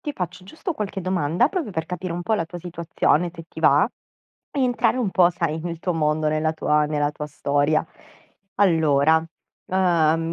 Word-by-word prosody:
ti 300 -5 -4
faccio 180 0 -5
giusto 320 - -5
qualche 205 -7 -4
domanda, 180 - +1
proprio 340 - -3
per 160 -3 -3
capire 180 0 -4
un 175 +1 -4
po' 220 +5 +1
la 185 - 0
tua 175 - -8
situazione, 170 -1 0
se 165 -1 -10
ti - - -9
va, - - +5 0.6
e 280 - -1
entrare 250 0 +2
un 220 -7 0
po', 180 -2 +4
sai, 165 -3 -2
nel 170 -1 -4
tuo 180 0 -2
mondo, 155 -1 +1
nella 155 +1 0
tua 150 -1 +1
nella 150 -1 0
tua 150 0 -6
storia. 145 +2 0 0.7
Allora, 160 -4 +3 0.4
uhm, 165 -3 +2
170 Hz, 180 wpm, -23 LUFS, 155-185 Hz, 0.7 s, va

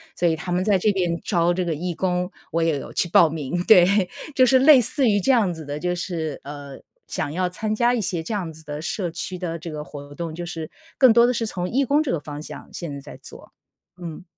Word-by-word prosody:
所 175 - +1
以 160 - +2
他 175 +3 -6
们 180 +1 +1
在 200 -1 +3
这 210 +3 +3
边 175 -3 -1
招 175 -2 +2
这 185 - -1
个 165 - -1
义 175 +3 -3
工， 180 +1 -1 0.2
我 165 +1 +1
也 160 -3 +1
有 - - -9
去 - - +1
报 165 -1 +6
名。 160 +3 -3
对， 185 -1 +5 0.2
就 255 -2 +5
是 260 +1 +5
类 270 -2 +7
似 265 +3 +2
于 205 -2 +3
这 265 +7 +2
样 210 -8 +3
子 160 -2 -9
的， 145 +1 -4
就 180 +3 -1
是， 170 -4 -4
呃， 140 -1 -9 0.3
想 145 - -3
要 180 0 0
参 215 +4 -3
加 240 +2 +3
一 240 - 0
些 180 -4 -2
这 215 - -4
样 180 -6 -3
子 160 - -15
的 150 +1 -5
社 175 0 -3
区 180 +2 -5
的 170 -2 -4
这 170 - -7
个 150 -1 -5
活 145 0 -10
动， 165 -2 -5
就 175 +1 -5
是 165 -2 -6 0.3
更 260 -4 +7
多 235 +1 +6
的 250 - +1
是 230 -1 -1
从 180 -4 -3
义 275 +3 +1
工 285 +4 +3
这 305 - -1
个 165 - 0
方 145 0 -8
向， - - -10
现 165 -5 -5
在 140 - -6
在 - - -11
做， - - -13 0.5
嗯。 170 +1 -7
175 Hz, 275 characters per minute, -23 LUFS, 160-205 Hz, 0.5 s, 类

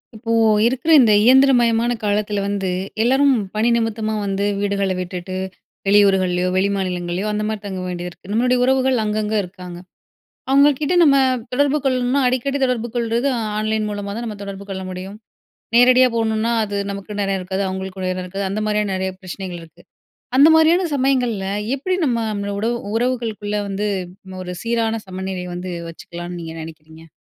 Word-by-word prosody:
இப்போ 230 +1 -5 0.3
இருக்கிற 260 +7 +1
இந்த 225 -5 +5
இயந்திரமயமான 240 -2 +4
காலத்தில 205 0 0
வந்து, 200 -2 -2 0.3
எல்லாரும் 270 +3 +4 0.2
பணி 220 +3 +2
நிமித்தமா 220 -1 -1
வந்து 195 0 -1
வீடுகளை 200 -1 0
விட்டுட்டு 180 0 -5 0.5
வெளியூர்கள்லயோ, 190 -3 +3
வெளிமாநிலங்கள்லையோ 185 -1 -1
அந்த 210 0 -2
மாரி 215 -1 -3
தங்க 190 -2 -4
வேண்டியிருக்கு. 180 +1 -7
நம்மளுடைய 250 +3 +2
உறவுகள் 260 -2 +2
அங்கங்க 215 0 -1
இருக்காங்க. 180 -1 -9 0.7
அவங்ககிட்ட 285 +3 +4
நம்ம 280 -3 +5 0.4
தொடர்பு 285 +3 +2
கொள்ளணும்னா 255 +1 +1
அடிக்கடி 260 +3 0
தொடர்பு 245 -2 -1
கொள்றது 235 +3 0 0.3
ஆன்லைன் 215 0 -1
மூலமா 205 -1 -4
தான் 235 - -4
நம்ப 215 -2 -5
தொடர்பு 200 0 -7
கொள்ள 190 -1 -5
முடியும். 185 +2 -7 0.6
நேரடியா 255 +1 +6
போணும்னா 225 0 0
அது 205 -1 -4 0.2
நமக்கும் 200 +1 -6
நேரம் 195 -1 0
இருக்காது, 190 +2 -3
அவங்களுக்கும் 190 0 -5
நேரம் 185 0 -2
இருக்காது. 195 +2 -4
அந்த 210 +2 -2
மாரியான 210 -1 0
நெறைய 190 0 -2
பிரச்சனைகள் 185 -2 -7
இருக்கு. 160 - -18 0.5
அந்த 285 +3 +8
மாரியான 335 +3 +4
சமயங்கள்ல 250 -7 +1 0.3
எப்படி 365 +7 -1
நம்ம 220 -5 -1
உடவு 230 +3 0 0.2
உறவுகளுக்குள்ள 225 -4 -1
வந்து 200 +1 -2 0.6
ஒரு 180 - -6
சீரான 230 -1 0
சமநிலை 185 -1 -5
வந்து 180 +1 -5 0.2
வச்சுக்கலாம்ன்னு 175 +1 -8
நீங்க 165 -1 -7
நெனைக்கிறீங்க? 160 0 -12
210 Hz, 145 wpm, -20 LUFS, 190-240 Hz, 0.7 s, அந்த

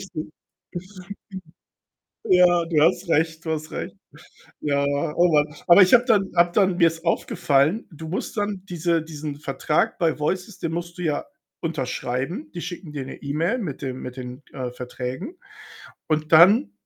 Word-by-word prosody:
richtig. 155 0 -5 2.0
Ja, 180 -1 +5
du 165 -2 +1
hast 170 +2 +2
recht 160 +1 +1
du 160 - -3
hast 155 0 -4
recht. - - -6 0.6
Ja, 140 -1 +1
oh 150 +4 +1
Mann. 150 0 +2
Aber 175 +4 +9
ich 185 +4 +7
habe 245 0 +6
dann 210 -6 +2
habe 175 0 +4
dann 190 -3 +3
mir 170 -2 +5
ist 165 0 -8
aufgefallen, 155 +2 +1
du 160 0 -9
musst 190 - -4
dann 205 -2 -2
diese 170 -1 0
diesen 150 -2 -6
Vertrag 150 +1 -1
bei 165 -3 +1
Voices, 185 +5 -2
den 165 -2 -3
musst 170 +1 -5
du - - -4
ja 150 -3 -1 0.4
unterschreiben. 150 - -3
Die 175 - -5
schicken 175 -3 -7
dir 135 -3 -5
'ne - - -8
E-Mail 160 - 0
mit 155 - -5
dem 130 -2 -5
mit 125 +1 -7
den, 125 +2 -8
äh, 125 -2 -4
Verträgen 125 - -6 0.7
und 155 0 -1
dann 170 - +7
160 Hz, 165 wpm, -23 LUFS, 145-180 Hz, 2.0 s, Aber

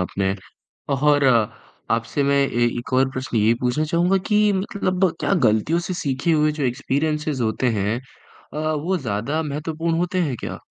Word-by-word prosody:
आपने। 95 +1 -1 0.6
और 145 +1 +3 0.7
आपसे 115 +5 0
मैं 140 0 +3
ए 120 -4 +2
एक 120 +2 -6
और 130 +1 +3
प्रश्न 130 -3 -3
ये 110 +2 +4
पूछना 125 +5 +1
चाहूँगा 175 +4 +2
कि 210 0 +4
मतलब 190 -1 0
क्या - - +1
गलतियों 110 +10 +2
से 175 +1 -4
सीखे 145 +1 -1
हुए 150 -1 +3
जो 150 -1 -4
एक्सपीरियंसेज़ 140 +2 -1
होते 110 +3 0
हैं 105 +4 0 0.5
अ, - - -5 0.2
वो 175 +5 -1
ज़्यादा 125 +4 -2
महत्वपूर्ण 160 +3 -2
होते 180 +1 0
हैं 145 -7 -1
क्या? - - -5
145 Hz, 165 wpm, -22 LUFS, 125-165 Hz, 0.7 s, ये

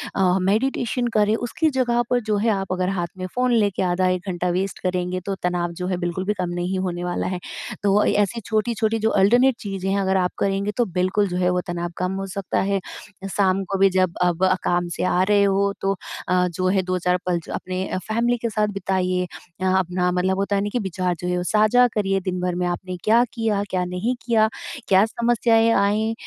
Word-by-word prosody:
अ, 185 -1 +3
meditation 240 +4 0
करें। 210 +1 +3
उसकी 245 +7 0
जगह 245 -4 +1
पर 245 - +3
जो 210 - +2
है 225 +3 +1
आप 195 -3 -1
अगर 185 0 0
हाथ 180 -3 -1
में 185 - -4
फ़ोन 250 0 +2
लेके 205 -5 +2
आधा 185 0 +1
1 185 +1 -2
घंटा 180 0 -1
वेस्ट 185 +2 -2
करेंगे 180 0 -1
तो 195 -1 -2
तनाव 175 -1 0
जो 180 - -2
है 180 -2 -1
बिल्कुल 175 +1 -3
भी 210 - +1
कम 180 -4 -3
नहीं 180 +2 -2
होने 175 -2 -3
वाला 180 0 -2
है। 180 -1 -3 0.4
तो 200 -1 +3
अ, - - +3
ऐसी 205 +3 +1
छोटी-छोटी 220 +1 0
जो 220 +1 +2
अल्टर्नेट 245 +5 +4
चीज़ें 195 -1 -2
अगर 190 -1 +1
आप 180 -1 +1
करेंगे 200 +1 0
तो 240 - +3
बिल्कुल 185 +3 0
जो 180 -1 -3
है 180 0 +2
वो 180 0 +1
तनाव 175 0 -3
कम 185 +1 -1
हो - - -3
सकता 195 0 -2
है 195 0 0 0.5
शाम 195 -1 +2
को 195 - +1
भी 195 0 +6
जब 185 -2 +1
अब 180 +1 +2 0.2
काम 175 0 +1
से - - -2
आ 180 0 +2
रहे 205 -1 +5
हो 200 0 +2
तो 195 0 +1 0.3
अ, 180 0 +2
जो 185 +2 -2
है 190 +1 +2
2-4 180 0 0
पल 180 -1 +1
ज - - -14
अपने 185 0 -3
फैमिली 235 +2 +1
के 230 0 -2
साथ 215 -1 +1
बिताइए। 185 -2 -1 0.3
यहाँ 190 0 +3
अपना 180 0 0
मतलब 185 +1 0
होता 200 +1 0
है 200 +1 0
कि 245 - +1
विचार 185 -3 -2
जो 180 - -4
है 180 0 0
साझा 215 +6 +4
करिए 195 -2 +1
दिन-भर 180 -1 -2
में 180 0 -1
आपने 180 +1 -4
क्या 230 +3 +5
किया, 220 -3 0
क्या 185 -1 0
नहीं 180 +8 -2
किया 225 -2 +4 0.4
क्या 190 +1 +5
समस्याएँ 230 0 +2
आईं, 215 +2 +2
190 Hz, 215 wpm, -22 LUFS, 180-215 Hz, 0.5 s, भी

